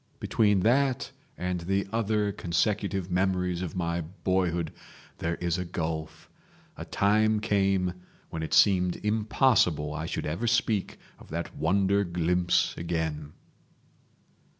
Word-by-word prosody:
Between 105 -4 +2
that 130 +4 +2 0.3
and 90 0 -2
the 95 +4 -1
other 105 -2 +1
consecutive 95 +1 -1
memories 90 -1 0
of 90 -4 -5
my 85 -1 -1
boyhood 85 -1 -1 0.5
there 85 +1 -1
is 85 0 -1
a - - -1
gulf. 80 -2 -4 0.5
A - - -7
time 110 +2 +2
came 95 -4 +1 0.4
when 80 - -4
it 80 -1 -1
seemed 90 -2 +4
impossible 105 - +2
I 80 +2 -4
should - - -3
ever 85 +10 -2
speak 115 -4 +1 0.2
of - - -15
that 85 +2 -5
wonder 100 +5 +2
glimpse 90 0 +1
again." 80 -3 -3
90 Hz, 125 wpm, -28 LUFS, 85-100 Hz, 0.5 s, seemed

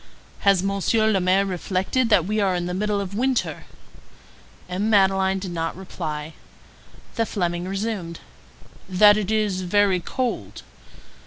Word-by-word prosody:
"Has 195 -2 +3
Monsieur 200 +3 +1
le 195 - +2
Maire 185 +2 +3
reflected 190 +6 -1
that 195 -7 +4
we 215 +3 -1
are 195 -3 +1
in 175 0 -2
the 180 - -3
middle 205 +2 -1
of 195 -1 -5
winter?" 255 +3 -1 1.0
M. 190 +4 -2
Madeleine 195 -2 +3
did 190 -1 -5
not 165 0 -3
reply. 160 -5 -6 0.8
The 230 - +2
Fleming 175 -2 -2
resumed:— 195 -4 -4 0.7
"That 205 +3 +6
it 210 -2 -2
is 210 -4 0
very 190 0 +2
cold?" 245 +8 -4
195 Hz, 140 wpm, -23 LUFS, 180-210 Hz, 1.0 s, That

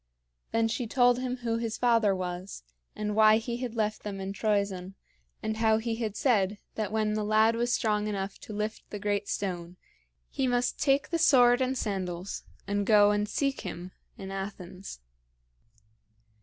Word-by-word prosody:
Then 225 0 +2
she 230 +1 -2
told 245 +1 +4
him 255 0 -2
who 230 0 +1
his 230 -1 -3
father 230 -5 +3
was, 180 - -5 0.3
and 210 -1 -2
why 215 0 +6
he 235 +1 -3
had 245 -2 -5
left 215 -1 -1
them 200 -2 -5
in 195 0 -4
Troezen, 200 -3 -1 0.5
and 220 0 -2
how 220 -1 +3
he 225 0 -2
had 220 -3 -3
said 210 -6 +2 0.2
that 210 -3 -3
when 215 -1 +1
the 215 0 -1
lad 215 +2 +4
was 240 +1 0
strong 210 -3 +1
enough 195 -1 -4
to - - -10
lift 210 +1 -4
the 210 - -5
great 205 0 -1
stone, 180 -3 -3 0.5
he 265 - 0
must 245 0 0
take 275 0 +2
the 335 - 0
sword 250 -5 +5
and 260 0 0
sandals 185 -4 -3 0.2
and 205 0 -1
go 205 -2 +6
and 210 0 0
seek 275 +5 -1
him 180 0 -6 0.3
in 195 -1 -7
Athens. 195 - -7
215 Hz, 170 wpm, -29 LUFS, 195-230 Hz, 0.5 s, why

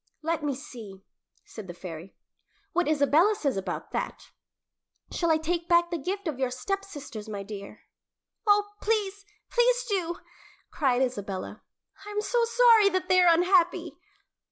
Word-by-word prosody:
"Let 330 0 -1
me 290 -3 -1
see," 225 -8 -10 0.4
said 215 -4 -10
the 175 - -8
fairy, 175 0 -9 0.6
"what 355 -1 +1
Isabella 310 +7 +4
says 285 - -1
about 195 - -4
that. - - -5 0.8
Shall 340 - 0
I 320 - +4
take 335 +2 -2
back 345 0 +4
the 340 - -2
gift 385 +5 -4
of 290 -5 -3
your 260 -1 +1
stepsisters, 285 - -5
my 200 -2 -5
dear?" 200 0 -9 0.7
"Oh, 410 0 +4
please, 405 -2 -1 0.2
please - - +3
do!" 360 -5 -1 0.6
cried 265 -4 +2
Isabella. 200 -7 -4 0.4
"I 415 - -9
am 415 0 -1
so 475 +2 +1
sorry 460 -3 +6
that 370 -1 -2
they 370 0 +6
are 350 -1 +6
unhappy." 350 +1 +2
335 Hz, 150 wpm, -27 LUFS, 250-395 Hz, 0.8 s, sorry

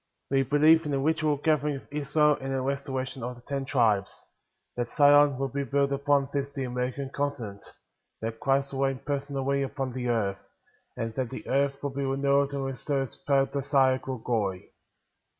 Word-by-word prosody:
10. 135 - +1
We - - +3
believe 155 +4 +5
in - - -3
the 140 - 0
literal 155 +1 +1
gathering 150 -1 +1
of 135 - -10
Israel 150 +1 +3
and 135 - -9
in 135 - -2
the 135 - 0
restoration 135 -1 -3
of 125 +2 -4
the 120 - -17
Ten 140 0 -3
Tribes; 115 -8 +2 0.6
that 120 -1 -3
Zion 145 -1 +6
will 135 +1 -1
be 140 +2 -2
built 140 +1 +1
upon 140 0 +2
this 140 -1 -1
[the 135 - -2
American] 125 +2 -3
continent; 130 -9 -3 0.6
that 115 0 -4
Christ 135 +1 +1
will 135 0 +1
reign 135 -1 -2
personally 140 -1 -1
upon 135 -1 -3
the 125 -1 -3
earth; 100 -5 0 0.6
and, 115 0 -3
that 125 0 -2
the 110 - -8
earth 140 +1 0
will 140 - -1
be 140 +1 -3
renewed 140 +1 +2
and 140 -1 -2
receive 135 +2 -2
its 135 -2 -2
paradisiacal 135 -3 +1
glory. 105 -6 -2
135 Hz, 185 wpm, -27 LUFS, 130-140 Hz, 0.6 s, Zion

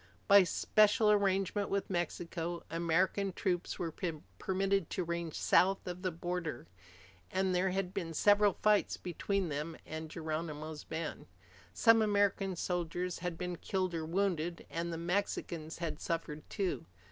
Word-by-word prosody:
By 200 -1 +9
special 215 +4 +4
arrangement 200 0 +2
with 200 0 -1
Mexico, 175 -1 -2
American 180 +4 +1
troops 180 -2 -1
were 165 -2 -3 0.5
permitted 195 -2 +1
to 185 - -1
range 170 -1 -3
south 195 +1 +3
of 180 0 -5
the 185 - 0
border, 170 - -4 0.6
and 190 0 +1
there 180 +1 +2
had 185 0 -2
been 165 -4 -3
several 205 +2 +5
fights 210 -1 +3
between 185 +1 -2
them 150 +3 -3
and 160 0 -6
Geronimo's 155 -1 -4
band. 160 0 -5 0.4
Some 225 - +5
American 200 -2 +2
soldiers 175 0 -2
had 175 -1 -3
been 180 0 -3
killed 185 -1 -1
or 165 -1 -2
wounded, 175 -2 -1
and 170 +1 -2
the 165 - -3
Mexicans 170 -2 -2
had 160 -3 -4
suffered 165 -2 -3
too. 175 - -2
180 Hz, 140 wpm, -33 LUFS, 165-195 Hz, 0.6 s, By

